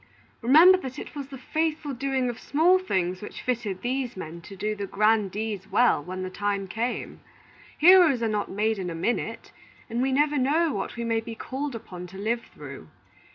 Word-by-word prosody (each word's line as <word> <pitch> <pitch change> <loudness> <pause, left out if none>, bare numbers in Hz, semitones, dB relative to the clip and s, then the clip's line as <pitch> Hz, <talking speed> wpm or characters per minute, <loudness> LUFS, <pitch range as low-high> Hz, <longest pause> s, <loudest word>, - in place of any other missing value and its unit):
remember 320 +10 +7
that 260 -6 -7
it - - -8
was 280 -2 -5
the 270 -1 -9
faithful 310 +1 -2
doing 265 0 -1
of 240 -1 -4
small 345 +6 +3
things 185 - -1
which 210 - -8
fitted 220 -7 -2
these 255 -3 -2
men 170 -1 -7
to 195 +4 -11
do 210 +3 -2
the 200 -1 -5
grand 215 0 +2
deeds 205 -1 -4
well, 245 -11 +3
when 185 +2 -5
the 185 - -4
time 200 0 -2
came. 230 +6 -3 0.6
Heroes 330 -7 +6
are - - +2
not 210 -1 -1
made 215 +1 0
in 180 -2 -3
a 165 - -5
minute, 230 +9 -2 0.4
and 235 +2 -1
we 265 +1 +1
never 295 +1 +2
know 300 +4 +2
what - - -4
we 235 - -4
may 230 -1 +1
be 225 0 -7
called 270 +3 -4
upon 180 -6 -8
to 190 +2 -12
live 225 +4 -1
through. 140 - -10
230 Hz, 200 wpm, -26 LUFS, 195-275 Hz, 0.6 s, remember